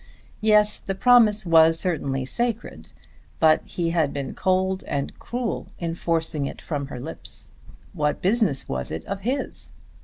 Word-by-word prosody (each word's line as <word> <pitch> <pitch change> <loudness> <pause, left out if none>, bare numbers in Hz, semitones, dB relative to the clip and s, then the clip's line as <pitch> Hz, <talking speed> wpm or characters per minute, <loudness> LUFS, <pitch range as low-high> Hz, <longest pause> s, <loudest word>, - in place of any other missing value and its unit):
Yes; 210 -1 +4
the 195 - -4
promise 220 -2 +5
was 165 -1 +5
certainly 140 -7 -1
sacred; 235 - -3 0.5
but 155 -1 +5
he 170 -2 -2
had 160 -4 +1
been 140 -2 -4
cold 190 0 0
and 140 -1 -2
cruel 245 -1 -3
in 170 -1 -3
forcing 160 -4 -1
it - - -7
from 145 -4 -4
her 130 - -7
lips. 155 +6 -2 0.4
What 150 -4 0
business 195 - +1
was 65 -1 -3
it 80 - -5
of 200 0 -4
his? 255 +8 -2
170 Hz, 150 wpm, -24 LUFS, 150-210 Hz, 0.5 s, promise